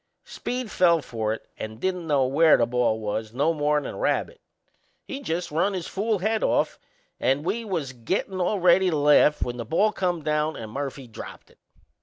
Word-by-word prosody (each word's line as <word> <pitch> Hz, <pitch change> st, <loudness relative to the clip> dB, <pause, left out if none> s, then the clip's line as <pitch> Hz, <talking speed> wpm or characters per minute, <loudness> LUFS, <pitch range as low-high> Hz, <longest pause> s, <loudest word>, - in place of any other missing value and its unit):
Speed 250 Hz, -3 st, -5 dB
fell 170 Hz, -2 st, +4 dB
for 110 Hz, -2 st, -2 dB
it 110 Hz, -, -6 dB
and 110 Hz, 0 st, -6 dB
didn't 180 Hz, 0 st, -2 dB
know 140 Hz, -4 st, +3 dB
where 155 Hz, +5 st, +5 dB
the 115 Hz, -, +3 dB
ball 120 Hz, -2 st, +1 dB
was 110 Hz, +1 st, -4 dB
no 150 Hz, +5 st, +2 dB
more'n 150 Hz, -1 st, +1 dB
a -, -, -5 dB
rabbit; -, -, -1 dB, 0.6 s
he 275 Hz, -, -6 dB
just 175 Hz, -8 st, -3 dB
run 180 Hz, +6 st, +1 dB
his 180 Hz, -3 st, -3 dB
fool 215 Hz, +2 st, -1 dB
head 215 Hz, +4 st, 0 dB
off -, -, +1 dB, 0.4 s
and 135 Hz, +4 st, +1 dB
we 215 Hz, +6 st, -1 dB
was 165 Hz, -11 st, -3 dB
gettin' 185 Hz, -, -2 dB
all 200 Hz, +4 st, +1 dB
ready 180 Hz, +1 st, +5 dB
to 160 Hz, -, 0 dB
laugh 150 Hz, +1 st, +4 dB
when 120 Hz, 0 st, -4 dB
the 120 Hz, -, -4 dB
ball 195 Hz, -, +2 dB
come 180 Hz, -5 st, -1 dB
down 150 Hz, +1 st, 0 dB
and 110 Hz, -2 st, -7 dB
Murphy 135 Hz, +1 st, -5 dB
dropped 115 Hz, -, -11 dB
it! -, -, -26 dB
155 Hz, 195 wpm, -25 LUFS, 130-185 Hz, 0.6 s, where